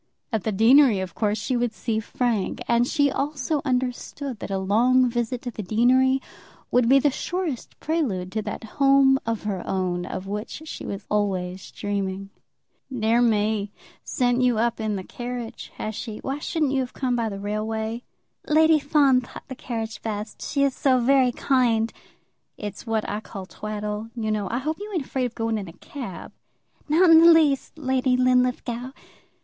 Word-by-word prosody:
At 220 - -1
the 220 - +1
deanery 230 +2 +5
of 185 -3 -5
course 210 -1 0
she 250 +4 -2
would 240 -1 0
see 220 0 -2
Frank; 225 -2 -1
and 235 +1 +3
she 285 -1 +2
also 290 +1 -1
understood 255 0 -2
that - - -6
a 195 - -1
long 240 +7 +3
visit 240 0 -2
to 245 - -4
the 215 - -6
deanery 255 +6 +3 0.5
would 245 -1 +3
be 270 - +7
the 280 +1 +3
surest 345 -3 -4
prelude 230 - -1
to 220 - -1
that 210 +1 -6 0.2
home 275 -1 +5
of 225 -2 -2
her 200 -4 -2
own 180 -1 -2
of 185 - -5
which 210 +9 -5
she - - -7
was 200 0 -5
always 190 -3 -1
dreaming. 195 -1 -4 0.6
"Dear 230 -1 +2
me; 210 -3 +1 0.3
sent 245 -1 +1
you 250 -3 +3
up 235 +1 0
in 215 -1 -1
the 190 - -4
carriage, 240 +2 -6
has 215 - -4
she? 215 0 -6
Why 270 +2 -4
shouldn't 305 -2 -1
you 270 - +1
have 255 -1 -3
come 255 -2 -1
by 230 -2 0
the 200 -1 -6
railway?" 220 +3 -3 0.5
"Lady 315 +1 +5
Fawn 280 -3 +3
thought 245 - -11
the 260 - -6
carriage 225 -3 -5
best. 210 -1 -5
She 280 -1 0
is 275 -1 +2
so 260 -2 +3
very 255 0 +4
kind." 235 -4 +1 0.6
"It's 205 +2 -7
what 220 -1 0
I 205 - -2
call 195 -3 -8
twaddle, 210 +2 -5
you 220 -2 -2
know. 210 -2 -1
I 235 - -1
hope 305 +6 -3
you 420 +1 -7
ain't 305 -6 -1
afraid 260 -1 -1
of 240 - -13
going 225 -1 -1
in 195 - -7
a 165 - -10
cab." 235 - -8 0.6
"Not 335 +3 +5
in 325 - +9
the 335 +1 +8
least, 310 -3 +3
Lady 260 -3 +1
Linlithgow." 250 0 +1
240 Hz, 180 wpm, -24 LUFS, 210-265 Hz, 0.6 s, in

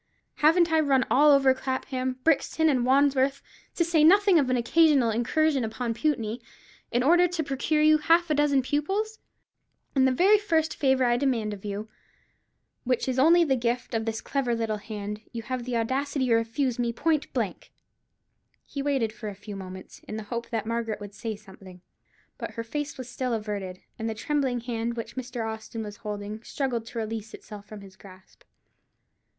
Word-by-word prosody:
Haven't 330 +2 +4
I 320 - +4
run 275 -4 +3
all 295 +3 +6
over 270 -2 +5
Clapham, 260 -1 -3
Brixton, 320 0 +2
and 255 -4 +2
Wandsworth—to 275 +4 +1
say 325 -2 +3
nothing 390 +1 +6
of 270 -3 +1
an 255 - +2
occasional 275 -1 +4
incursion 270 +5 +1
upon 230 +1 -3
Putney—in 240 -2 -3
order 345 +5 +5
to 350 -2 -2
procure 295 +2 0
you 310 0 +5
half 335 +2 +3
a - - +5
dozen 285 -2 +2
pupils? 390 - -1 0.7
And 265 -1 +4
the - - +3
very 385 +10 +5
first 325 -6 0
favour 265 -2 +2
I 240 0 +3
demand 240 -6 0
of 195 - -10
you, 205 +1 -4 1.0
which 250 0 0
is 260 0 0
only 335 +5 +6
the 275 -5 +2
gift 240 0 -2
of 225 -1 -1
this 225 -1 -3
clever 265 -4 -1
little 225 -2 -1
hand, 210 0 -6
you 230 -1 -5
have 250 +1 -4
the 250 -2 -1
audacity 265 +4 -1
to - - +4
refuse 230 +2 -1
me 240 -1 +1
point 305 +5 0
blank." - - -3 0.9
He 280 - -5
waited 270 -6 0
for 220 -2 -6
a 200 - -8
few 205 +1 -9
moments, 185 -1 -9
in 215 - -5
the 220 - -5
hope 235 0 -4
that 225 -2 -2
Margaret 230 -1 -2
would 205 -1 -9
say 225 0 -5
something; 190 -3 -14 0.6
but - - -6
her 230 - -3
face 290 +5 -4
was 255 -2 -7
still 250 0 -3
averted, 205 -4 -4 0.2
and 225 0 -2
the 220 - -4
trembling 260 0 -1
hand 235 0 -3
which 230 +1 -6
Mr. 245 -3 -4
Austin 220 0 -6
was 205 -1 -8
holding 210 +1 -6
struggled 240 -3 -3
to 240 - -9
release 220 -1 -4
itself 205 -2 -11
from 215 -1 -10
his 195 -1 -14
grasp. 185 -1 -17
250 Hz, 180 wpm, -26 LUFS, 220-290 Hz, 1.0 s, all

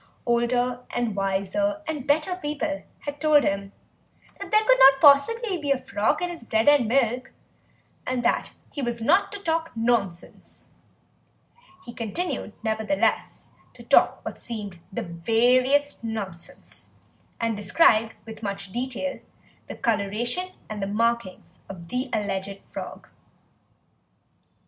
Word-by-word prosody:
Older 245 +1 +1
and 235 -4 -2
wiser 200 +11 0
and 295 -4 -4
better 315 +5 +2
people 295 -2 -3 0.2
had 290 0 -6
told 305 -2 +5
him 195 0 -1 0.7
that - - -7
there 430 0 +4
could - - +5
not 270 0 +8
possibly 355 - +5
be 290 -2 -4
a 275 - +4
frog 215 +5 0
in 355 - -1
his 335 -7 -8
bread 220 +1 0
and 290 -5 +6
milk 250 +1 +1 0.7
and 255 -1 -1
that - - +1 0.2
he 285 - -4
was 240 -2 -2
not 340 - +3
to 410 - -5
talk 330 -3 -1
nonsense; 225 -7 -2 1.1
he 235 - -8
continued, 230 - -3
nevertheless, 220 +5 -1 0.2
to - - -12
talk - - +3
what - - -6
seemed 205 -7 -7
the - - -3
veriest 250 +11 +2
nonsense, 200 -7 -6 0.5
and 230 -1 0
described 220 - +3
with 225 0 -10
much 200 -2 -5
detail 260 +4 -3 0.5
the - - -7
colouration 230 - -1 0.2
and 205 -1 -4
markings 230 -3 -1
of 170 -3 -9
the 255 +1 -2
alleged 195 -2 -3
frog. - - -8
240 Hz, 130 wpm, -25 LUFS, 210-290 Hz, 1.1 s, not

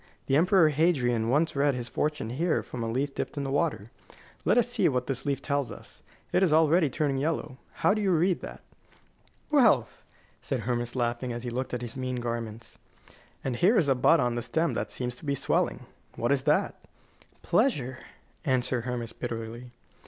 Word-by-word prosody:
The 135 - +1
Emperor 175 +1 +5
Hadrian 130 -8 +1
once 150 +5 +2
read 140 -1 +2
his 120 -1 -4
fortune 150 -4 -2
here 160 +6 0
from 125 - -7
a 115 - -2
leaf 135 +4 -1
dipped - - -4
in 140 - -1
the 135 - -3
water. 140 - -1 0.5
Let - - +4
us - - +4
see - - +2
what 125 -1 -1
this 135 0 -3
leaf 140 -1 -1
tells 140 -3 -1
us. - - -12 0.3
It - - +3
is 185 -5 +3
already 160 0 +4
turning 140 -1 -1
yellow. 140 -3 -2 0.3
How - - +6
do 215 - -1
you 200 - +1
read 175 +2 +2
that?" - - -9 0.9
"Wealth," 280 -5 +3 0.4
said 130 -4 -2
Hermas, 120 +1 -2
laughing, 120 0 -1
as 120 0 -5
he 120 - -4
looked 125 +1 -3
at 125 - -5
his 115 -1 -7
mean 130 -1 -3
garments. 115 -2 -5 0.6
"And 130 -3 -2
here 205 - +4
is 160 - +3
a - - +6
bud 130 +6 +4
on 120 -2 +1
the 120 - -2
stem 160 +7 0
that - - -2
seems 125 -1 -3
to - - -13
be 140 -1 0
swelling. 135 - 0 0.3
What 120 - 0
is 135 -2 +1
that?" 150 +6 +1 0.6
"Pleasure," 130 - +1 0.4
answered 125 -3 0
Hermas, 120 -2 -4
bitterly. 115 0 -6
130 Hz, 190 wpm, -28 LUFS, 120-155 Hz, 0.9 s, How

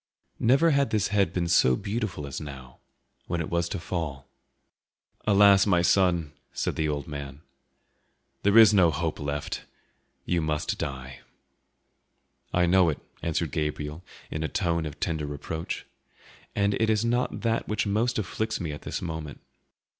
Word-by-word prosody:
Never 135 +8 +4
had 140 -3 +2
this 105 -2 +1
head 100 -4 +2
been 90 -2 -1
so 65 -7 +4
beautiful 100 - -3
as 70 - -6
now, 65 -3 -9 0.5
when 85 - -1
it 80 - -4
was 85 0 0
to - - -3
fall. 80 -6 -4 1.0
"Alas, 100 -1 +6
my 90 -3 +4
poor - - -1
son!" 85 -4 +2 0.2
said - - -2
the 80 -1 0
old 70 -2 -3
man, 70 -1 -7 1.0
"there 100 +2 +4
is 110 -2 +9
no 90 -5 +6
hope 80 +1 -2
left; 70 0 -3 0.6
you 85 -1 +1
must 75 -1 -2
die." 65 -1 -5 1.3
"I 90 0 +3
know 90 0 +4
it," 75 - -2 0.2
answered 85 -2 -1
Gabriel 75 +2 -3 0.3
in 75 - -3
a 80 - 0
tone 85 -2 0
of 75 0 -9
tender 80 -3 -1
reproach, 75 +3 -5 0.7
"and 100 0 +2
it 110 - +3
is 110 +1 +2
not 120 +2 0
that 115 0 0
which 105 +1 0
most 110 +4 +1
afflicts 110 +2 -2
me 85 -4 -3
at 75 - -7
this - - -4
moment. 80 -4 -5
85 Hz, 160 wpm, -27 LUFS, 75-100 Hz, 1.3 s, is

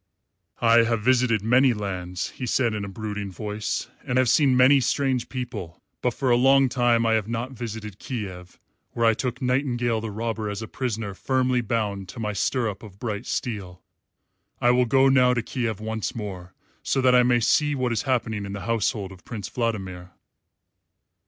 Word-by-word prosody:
"I 115 0 +6
have 115 -2 0
visited 125 -4 +3
many 125 +3 +4
lands," 90 -3 -4
he 125 - -6
said 120 -1 +1
in 105 -1 -3
a - - -4
brooding 105 -1 -5
voice, 105 +3 -3 0.2
"and 125 - -1
have 130 -2 +3
seen 135 -2 +4
many 135 +2 +6
strange 130 -1 0
people, 120 -10 -6 0.2
but 125 -2 0
for 130 -2 0
a - - +6
long 135 +2 +5
time 120 -2 +2
I 115 - +3
have 110 -2 +1
not 120 +3 -3
visited 110 -4 -7
Kiev, 95 -8 -6 0.4
where 115 - +1
I 115 - +5
took 125 +2 -3
Nightingale 120 -3 0
the 110 - -4
Robber 110 0 -3
as 105 +2 -4
a - - -6
prisoner 115 -6 -3
firmly 130 +3 +1
bound 100 -4 -2
to 100 - -9
my 105 -2 -2
stirrup 110 -1 -1
of 100 -4 -12
bright 110 +1 -4
steel. 95 -7 -4 0.8
I 120 - +4
will 125 0 +3
go 135 +3 +4
now 125 -2 +4
to 120 - -1
Kiev 115 -4 -3
once 110 0 -3
more, 95 -5 -7 0.3
so - - 0
that 130 -1 +4
I 125 - +7
may 120 0 +3
see 145 +6 +2
what 130 -2 -1
is 115 - 0
happening 115 -6 -1
in 100 0 -6
the 100 - -5
household 105 -2 -1
of 90 -2 -14
Prince 105 -5 -6
Vladimir." 95 -7 -3
115 Hz, 185 wpm, -25 LUFS, 105-125 Hz, 0.8 s, I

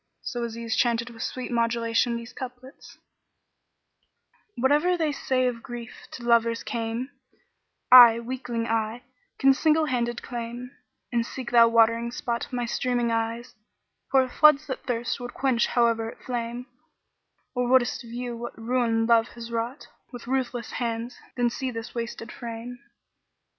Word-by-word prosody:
So 240 -2 -3
Aziz 230 0 -4
chanted 235 -1 +1
with 225 -1 -11
sweet 255 -1 -4
modulation 235 0 +1
these 235 +1 -9
couplets, 255 +1 -10 1.6
"Whate'er 295 +8 +3
they 315 -3 +1
say 260 -2 0
of 240 -2 -1
grief 240 -2 -9
to 245 - -8
lovers 230 -1 +2
came, 230 +3 -3 0.4
* - - -52 0.2
I, 230 0 -1
weakling 235 -1 -4
I, 225 +1 -1 0.3
can 270 0 +5
single 310 +3 +3
handed 240 -3 -2
claim: 240 +1 -6 0.4
An 235 -1 +1
seek 250 +1 -7
thou 235 -1 +7
watering 230 0 +3
spot,[FN#41] 235 +1 -4
my 245 -1 -2
streaming 240 0 0
eyes 230 +2 -2 0.3
* - - -45
Pour 265 -1 +4
floods 300 +2 +5
that 265 - -6
thirst 240 -1 -1
would 245 0 -7
quench 260 -4 +2
howe'er 230 -2 +1
it - - -11
flame 240 0 -4 0.9
Or 250 -1 0
wouldest 250 -1 +3
view 240 0 -5
what 240 +1 -7
ruin 230 -1 +1
Love 230 0 +4
has 235 0 -8
wrought 235 +4 -3
* - - -41
With 245 -2 -9
ruthless 250 -2 -2
hands, 235 0 -3 0.2
then 240 -1 +2
see 260 +2 -3
this 230 -1 -7
wasted 230 0 -5
frame." 235 +1 -7
240 Hz, 150 wpm, -26 LUFS, 230-250 Hz, 1.6 s, thou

